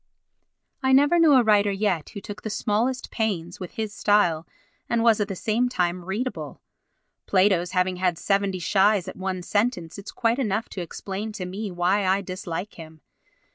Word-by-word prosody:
I 265 -1 +2
never 290 +6 +5
knew 320 -3 +6
a 255 -2 +6
writer 205 -2 +4
yet 195 -5 -1
who 200 - -8
took 205 +1 -8
the 220 - -4
smallest 235 +5 -1
pains 180 -7 -2
with 180 -2 -7
his 220 -2 -4
style 175 -7 +2 0.4
and 235 -1 +1
was 230 -2 +4
at 205 - 0
the 195 - -4
same 230 +6 0
time 180 -5 -1
readable. 225 +7 -4 0.7
Plato's 185 -2 +3
having 180 0 +1
had 180 -2 0
seventy 195 +1 0
shies 195 +1 +2
at 185 - -6
one 185 -1 -4
sentence 205 -4 -1
is 200 - -9
quite 235 +2 0
enough 220 -3 -1
to 190 - -6
explain 195 +5 -5
to 185 - -5
me 200 +4 -5
why 180 +3 +1
I 190 +1 +2
dislike 185 0 -5
him. 160 -1 -11
200 Hz, 175 wpm, -25 LUFS, 180-220 Hz, 0.7 s, knew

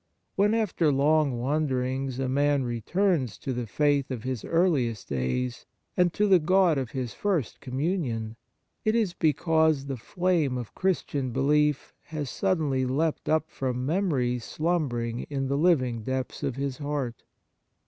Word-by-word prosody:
When, 205 +3 +3
after 180 -8 +1
long 145 -1 +3
wanderings, 130 -1 -1
a 135 0 -1
man 140 +1 +2
returns 130 - 0
to 135 - -4
the 120 -1 -3
faith 145 +3 +1
of 125 -4 -4
his 130 -3 -3
earliest 145 - +1
days, 65 -2 -2 0.3
and 180 -1 +3
to 210 - +2
the 190 -3 +6
God 175 -2 +3
of 130 -3 -3
his 125 -2 -4
first 180 - -1
Communion, 130 - -2 0.5
it 215 +1 +2
is 215 -6 +1
because 160 -2 +2
the 135 -2 -4
flame 165 -1 0
of 120 -3 -6
Christian 145 -8 -1
belief 150 +3 +1
has 150 -4 -4
suddenly 155 -9 0
leapt 145 +5 -1
up 155 0 +1
from 125 -1 -2
memories 135 - 0
slumbering 125 -9 -1
in 135 -2 -2
the 140 - +1
living 135 -8 +2
depths 130 +3 -3
of 130 - -2
his 135 -1 -3
heart. 145 -5 -3
140 Hz, 150 wpm, -27 LUFS, 125-160 Hz, 0.5 s, the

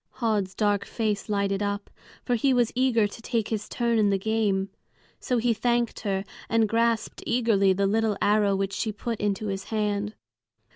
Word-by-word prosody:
Höd's 210 -5 0
dark 205 -2 +1
face 215 -2 -2
lighted 200 -1 0
up, 205 0 -3 0.3
for 245 - 0
he 255 +3 +2
was 240 -2 +2
eager 250 -3 +3
to 205 +2 -7
take 230 -2 -1
his 215 -2 -3
turn 235 -2 +1
in 210 -1 +4
the 195 - +2
game. 200 -2 0 0.5
So 250 - -1
he 235 0 +2
thanked 235 +1 0
her, 195 -3 -1 0.3
and 225 -1 +3
grasped 230 0 0
eagerly 225 -5 +3
the 195 +1 +1
little 215 +1 +1
arrow 205 -1 +3
which 195 0 -2
she 220 - -1
put 225 +2 -4
into 205 +1 -1
his 195 -1 -3
hand. 210 -1 -1
215 Hz, 180 wpm, -26 LUFS, 200-230 Hz, 0.5 s, in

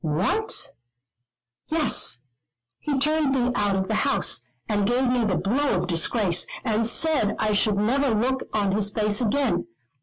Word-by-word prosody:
"What?" 185 - -1 1.0
"Yes, 305 - +1 0.6
he 290 -2 -2
turned 295 0 +1
me 250 -1 +1
out 205 -4 0
of 190 0 -1
the 220 - -2
house, 175 - +1 0.2
and 205 -2 0
gave 250 +2 +1
me 245 -2 +1
the 185 -4 0
blow 270 +9 0
of - - -1
disgrace, 175 +2 +1 0.2
and 220 -1 +1
said 290 -5 +2
I 215 0 0
should 205 0 +2
never 260 +7 +1
look 245 +4 -1
on 205 -2 0
his 205 +1 0
face 210 +1 0
again. 240 - 0
220 Hz, 155 wpm, -24 LUFS, 200-265 Hz, 1.0 s, said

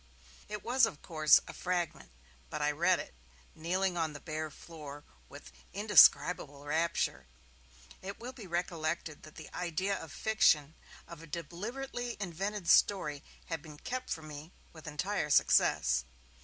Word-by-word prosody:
It 210 -2 -5
was, 250 0 +4
of 150 - -9
course, 155 -2 +5
a - - -8
fragment, 175 - -3 0.4
but 150 - -4
I 150 0 +2
read 175 +4 +3
it, - - -7 0.4
kneeling 180 +3 -1
on 160 -2 -1
the 145 - -8
bare 155 0 -4
floor, 145 -2 -10 0.3
with 60 - -12 0.2
indescribable 140 0 +5
rapture. 150 - 0 0.7
It 195 +1 -6
will 245 +2 -7
be 230 -7 -10
recollected 170 -2 -2
that 155 - -14
the 155 - -11
idea 180 +3 -1
of 160 - -8
fiction, 160 -9 +3 0.3
of 170 -2 -10
a 165 - -11
deliberately 235 - -5
invented 195 +1 -4
story, 150 -8 +4 0.2
had 165 -3 -4
been 150 -1 -12
kept 255 +9 -5
from 160 -1 -4
me 150 +2 -9 0.2
with 160 -2 -12
entire 150 +2 -2
success. 65 - +4
165 Hz, 145 wpm, -32 LUFS, 150-190 Hz, 0.7 s, course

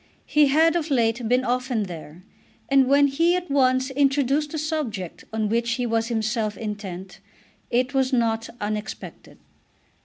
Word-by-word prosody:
He 300 -1 +4
had 320 +4 +4
of 330 -2 -1
late 235 -3 +1
been 250 +1 +3
often 250 -2 0
there, 170 -2 -9 0.5
and 270 -1 +4
when 280 +1 +5
he 330 +6 +2
at 360 -4 -4
once 260 -1 +2
introduced 280 +1 +1
the 315 - -4
subject 290 - -4
on 220 -1 -1
which 230 +2 0
he 250 0 -2
was 225 -1 0
himself 220 -2 -1
intent 195 -4 -6 0.5
it 250 +3 0
was 265 -1 +1
not 230 -2 0
unexpected. 210 +1 -6
250 Hz, 150 wpm, -24 LUFS, 220-280 Hz, 0.5 s, when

